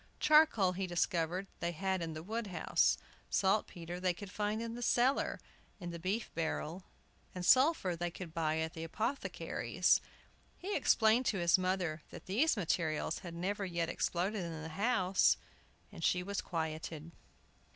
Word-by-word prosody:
Charcoal, 300 Hz, -12 st, +5 dB
he 185 Hz, +1 st, -3 dB
discovered, 175 Hz, +1 st, 0 dB
they 170 Hz, 0 st, -2 dB
had 190 Hz, +2 st, -1 dB
in 165 Hz, -1 st, -3 dB
the 155 Hz, 0 st, -7 dB
wood 220 Hz, +4 st, -3 dB
house; 180 Hz, -, +2 dB, 0.3 s
saltpetre 180 Hz, -3 st, 0 dB
they 180 Hz, -1 st, +1 dB
would 200 Hz, -2 st, -8 dB
find 210 Hz, +1 st, -1 dB
in 230 Hz, 0 st, -4 dB
the 240 Hz, -, -6 dB
cellar, 245 Hz, +3 st, +2 dB, 0.4 s
in 175 Hz, -3 st, -5 dB
the 170 Hz, -, -6 dB
beef 195 Hz, +7 st, -2 dB
barrel; 165 Hz, +2 st, -3 dB, 0.5 s
and 180 Hz, -1 st, -4 dB
sulphur 255 Hz, -, +4 dB
they 175 Hz, +1 st, -2 dB
could 170 Hz, -1 st, -8 dB
buy 160 Hz, -1 st, 0 dB
at 160 Hz, +1 st, -2 dB
the 160 Hz, -, -6 dB
apothecary's. 220 Hz, -, 0 dB, 0.6 s
He 400 Hz, +3 st, -3 dB
explained 225 Hz, +3 st, +4 dB
to 205 Hz, -, +1 dB
his 170 Hz, +1 st, +4 dB
mother 185 Hz, -4 st, -1 dB
that -, -, -11 dB
these 235 Hz, +9 st, +2 dB
materials 160 Hz, -4 st, 0 dB
had 170 Hz, -2 st, -8 dB
never 200 Hz, +4 st, -2 dB
yet 170 Hz, -3 st, -1 dB
exploded 185 Hz, +5 st, -1 dB
in 165 Hz, -2 st, -5 dB
the 160 Hz, -, -6 dB
house, 195 Hz, 0 st, +3 dB, 0.5 s
and -, -, -9 dB
she 180 Hz, 0 st, +2 dB
was 200 Hz, +2 st, -3 dB
quieted. 160 Hz, -1 st, -4 dB
180 Hz, 160 wpm, -34 LUFS, 165-210 Hz, 0.6 s, Charcoal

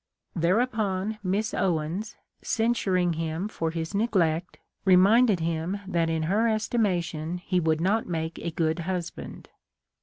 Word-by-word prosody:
Thereupon 205 Hz, +2 st, 0 dB
Miss 205 Hz, +3 st, -1 dB
Owens, 175 Hz, +5 st, -1 dB, 0.3 s
censuring 190 Hz, -6 st, +1 dB
him 165 Hz, +4 st, -2 dB
for 165 Hz, -6 st, -2 dB
his 165 Hz, +2 st, -4 dB
neglect, 180 Hz, -6 st, +1 dB, 0.3 s
reminded 195 Hz, +2 st, +5 dB
him 165 Hz, +3 st, -1 dB
that 170 Hz, -3 st, +1 dB
in 160 Hz, -1 st, 0 dB
her 205 Hz, +8 st, +2 dB
estimation 180 Hz, -7 st, 0 dB
he 180 Hz, 0 st, -1 dB
would 160 Hz, -2 st, +1 dB
not 200 Hz, +6 st, +1 dB
make 160 Hz, -1 st, -3 dB
a 170 Hz, -, -3 dB
good 160 Hz, 0 st, 0 dB
husband. 175 Hz, 0 st, -5 dB
180 Hz, 125 wpm, -27 LUFS, 165-210 Hz, 0.3 s, reminded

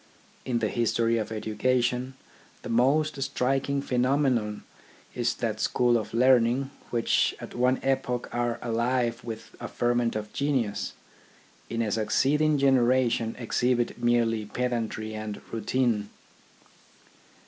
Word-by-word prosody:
In 125 Hz, -2 st, 0 dB
the 115 Hz, -2 st, 0 dB
history 115 Hz, 0 st, +1 dB
of 110 Hz, -, -4 dB
education, 125 Hz, +4 st, 0 dB, 0.5 s
the -, -, -6 dB
most 140 Hz, +5 st, +2 dB
striking 135 Hz, +1 st, 0 dB
phenomenon 125 Hz, -4 st, +1 dB, 0.5 s
is 120 Hz, -1 st, 0 dB
that 110 Hz, -2 st, -2 dB
schools 120 Hz, +2 st, +2 dB
of 110 Hz, -3 st, -1 dB
learning, 125 Hz, +2 st, +3 dB, 0.2 s
which 115 Hz, -1 st, +1 dB
at -, -, -9 dB
one 125 Hz, +1 st, +2 dB
epoch 130 Hz, -2 st, -1 dB
are 120 Hz, -1 st, 0 dB
alive 120 Hz, 0 st, 0 dB
with 110 Hz, -1 st, -8 dB
a -, -, -5 dB
ferment 120 Hz, -1 st, 0 dB
of 105 Hz, 0 st, -5 dB
genius, 130 Hz, -8 st, -1 dB, 0.8 s
in 115 Hz, 0 st, -1 dB
a 105 Hz, -, -2 dB
succeeding 145 Hz, +8 st, +2 dB
generation 125 Hz, -4 st, +2 dB
exhibit 120 Hz, 0 st, 0 dB
merely 115 Hz, -2 st, +2 dB
pedantry 115 Hz, -2 st, -2 dB
and 110 Hz, -1 st, -5 dB
routine. 115 Hz, -2 st, 0 dB
120 Hz, 115 wpm, -27 LUFS, 115-130 Hz, 0.8 s, learning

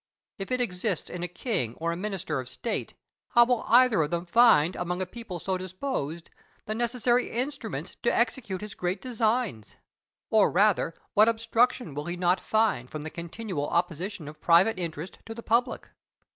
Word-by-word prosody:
If 195 Hz, -, -6 dB
it 255 Hz, -, +1 dB
exists 185 Hz, -5 st, -2 dB
in 180 Hz, -, -5 dB
a 175 Hz, -, -2 dB
king 175 Hz, -, -2 dB
or 165 Hz, +1 st, -2 dB
a -, -, -2 dB
minister 185 Hz, -6 st, -3 dB
of 130 Hz, -1 st, -6 dB
state, 230 Hz, -, -4 dB, 0.4 s
how 240 Hz, 0 st, +8 dB
will 245 Hz, -2 st, +1 dB
either 245 Hz, -5 st, +6 dB
of 150 Hz, -, 0 dB
them 170 Hz, +1 st, -2 dB
find 180 Hz, -5 st, +5 dB
among 180 Hz, +1 st, -3 dB
a 185 Hz, -, -1 dB
people 210 Hz, -1 st, -8 dB
so 185 Hz, +2 st, -2 dB
disposed 185 Hz, -, -4 dB, 0.3 s
the 215 Hz, -, -2 dB
necessary 240 Hz, +1 st, +1 dB
instruments 275 Hz, +5 st, -4 dB
to -, -, +2 dB
execute 200 Hz, -8 st, -1 dB
his 210 Hz, -1 st, -7 dB
great 180 Hz, +2 st, -2 dB
designs; 225 Hz, -, -1 dB, 0.6 s
or, 215 Hz, -2 st, +5 dB
rather, 190 Hz, -3 st, +2 dB, 0.2 s
what 215 Hz, +2 st, +6 dB
obstruction 230 Hz, -, +1 dB
will 145 Hz, +1 st, -5 dB
he 175 Hz, +1 st, -4 dB
not 180 Hz, +1 st, +2 dB
find 215 Hz, -, +1 dB
from 155 Hz, -1 st, -6 dB
the 155 Hz, -, -6 dB
continual 170 Hz, -2 st, -4 dB
opposition 175 Hz, 0 st, -2 dB
of 155 Hz, +1 st, -11 dB
private 185 Hz, +5 st, +4 dB
interest 165 Hz, 0 st, -5 dB
to 225 Hz, -, -6 dB
public? 235 Hz, +2 st, 0 dB
190 Hz, 170 wpm, -27 LUFS, 170-230 Hz, 0.6 s, how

